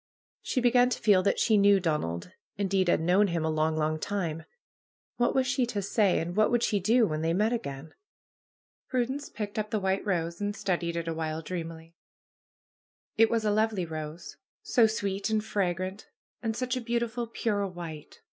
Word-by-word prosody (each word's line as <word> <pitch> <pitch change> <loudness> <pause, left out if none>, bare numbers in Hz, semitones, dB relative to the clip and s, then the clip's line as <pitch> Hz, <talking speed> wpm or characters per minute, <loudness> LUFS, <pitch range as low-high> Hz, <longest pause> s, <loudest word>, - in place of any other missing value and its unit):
She 260 - -1
began 245 0 +4
to 250 - -2
feel 200 -4 +4
that 200 - +1
she 220 -2 +3
knew 200 0 +6
Donald; 150 - -2 0.3
indeed, 195 -2 +1
had - - +3
known 185 +5 +4
him 170 -3 -1
a 160 - +1
long, 155 0 +1
long 155 0 0
time 165 -4 -3 0.7
What 240 - +1
was 265 -1 +3
she 255 -1 +1
to 205 -4 -2
say, 200 -1 +2
and 175 +2 -3
what 215 0 +4
would 240 -1 +1
she 205 - +2
do, 225 +5 +4
when 155 -5 -2
they 165 +1 +1
met 215 +5 +2
again? 150 - -5 0.9
Prudence 260 +3 -2
picked 210 -1 -4
up 215 0 -2
the 215 - 0
white 190 0 0
rose 170 -3 -2
and 205 0 -1
studied 175 -4 -1
it 170 -1 -3
a 165 - -1
while 160 0 -3
dreamily. 165 -1 -6 1.2
It 225 +1 +5
was 225 -2 0
a 210 - +3
lovely 215 -3 +1
rose. 155 -1 -7 0.3
So 235 -3 +4
sweet 200 -1 -2
and 215 -1 0
fragrant! 185 -1 -2 0.3
And 225 -2 -2
such 255 -1 -1
a 255 - -2
beautiful 235 0 -2
pure 210 -3 -1
white 170 -5 -9
200 Hz, 185 wpm, -28 LUFS, 165-220 Hz, 1.2 s, knew